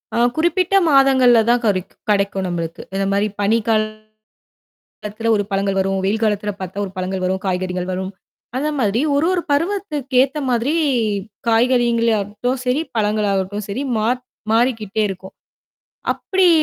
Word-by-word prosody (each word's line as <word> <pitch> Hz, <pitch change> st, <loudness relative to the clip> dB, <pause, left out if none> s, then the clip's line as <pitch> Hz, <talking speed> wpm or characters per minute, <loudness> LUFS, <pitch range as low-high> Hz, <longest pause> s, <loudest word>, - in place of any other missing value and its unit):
ஆ -, -, 0 dB, 0.2 s
குறிப்பிட்ட 345 Hz, +4 st, +1 dB
மாதங்கள்ல 265 Hz, -4 st, +5 dB
தான் 240 Hz, 0 st, +3 dB
கறைக்கும் 185 Hz, -3 st, -1 dB
கிடைக்கும் 200 Hz, -2 st, +1 dB
நம்மளுக்கு. 170 Hz, -2 st, -4 dB
இந்த 195 Hz, 0 st, 0 dB
மாரி 200 Hz, +1 st, +2 dB
பனிக்கா 220 Hz, +2 st, +2 dB, 1.3 s
காலத்துல 220 Hz, +2 st, -2 dB
ஒரு 205 Hz, -, 0 dB
பழங்கள் 195 Hz, 0 st, 0 dB
வரும். 195 Hz, 0 st, 0 dB
வெயில் 215 Hz, +3 st, 0 dB
காலத்தில 210 Hz, -1 st, 0 dB
பாத்தா 190 Hz, +2 st, -6 dB
ஒரு 190 Hz, -, -10 dB
பழங்கள் 185 Hz, 0 st, -3 dB
வரும், 190 Hz, +1 st, 0 dB
காய்கறிகள் 180 Hz, -1 st, -2 dB
வரும். 190 Hz, +1 st, -3 dB, 0.5 s
அந்த 290 Hz, +4 st, 0 dB
மாரி 220 Hz, -1 st, +1 dB, 0.2 s
ஒரு 295 Hz, +3 st, +2 dB
ஒரு 360 Hz, -2 st, 0 dB
பருவத்துக்கு 300 Hz, -5 st, -1 dB
ஏத்த 275 Hz, +3 st, -2 dB
மாதிரி 245 Hz, +4 st, +1 dB, 0.8 s
காய்கறியங்கள் 235 Hz, 0 st, +3 dB
ஆகட்டும் 215 Hz, +6 st, -3 dB
சரி, 250 Hz, +4 st, +2 dB, 0.2 s
பழங்கள் 210 Hz, -1 st, +1 dB
ஆகட்டும் 195 Hz, +2 st, -2 dB
சரி, 210 Hz, +7 st, -3 dB, 0.2 s
மாற் 240 Hz, +4 st, 0 dB, 0.3 s
மாறிக்கிட்டே 225 Hz, -3 st, +1 dB
இருக்கும். 190 Hz, 0 st, -8 dB, 0.8 s
அப்படி 380 Hz, -1 st, +2 dB
215 Hz, 140 wpm, -19 LUFS, 195-255 Hz, 1.3 s, மாதங்கள்ல